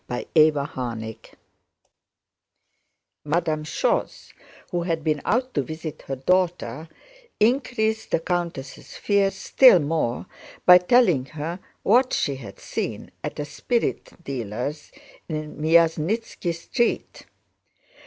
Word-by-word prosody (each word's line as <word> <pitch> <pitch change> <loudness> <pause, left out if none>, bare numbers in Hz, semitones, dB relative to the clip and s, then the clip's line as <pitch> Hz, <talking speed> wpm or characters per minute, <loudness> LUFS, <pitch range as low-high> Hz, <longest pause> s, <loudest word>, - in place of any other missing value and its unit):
CHAPTER 125 - -3 0.3
XIV 125 -6 -4 2.1
Madame 155 0 0
Schoss, 155 - -2 0.4
who 175 - 0
had 165 -2 -2
been 155 -2 0
out 255 +2 0
to 145 - +1
visit 155 +3 -7
her 135 - -2
daughter, 160 -2 0 0.5
increased 220 -2 +1
the - - +1
countess' 170 -6 -4
fears 200 -1 +1
still 255 -7 +6
more 150 -5 -1 0.4
by 180 0 +9
telling 180 - +3 0.5
what 250 +5 +4
she 140 -2 0
had 105 -7 -11
seen - - -5
at - - -5
a 145 - -2
spirit 230 - -2
dealer's 130 +3 -5 0.4
in 155 -1 -4
Myasnítski 165 +5 +1
Street. 235 +8 -2
160 Hz, 105 wpm, -24 LUFS, 140-190 Hz, 2.1 s, by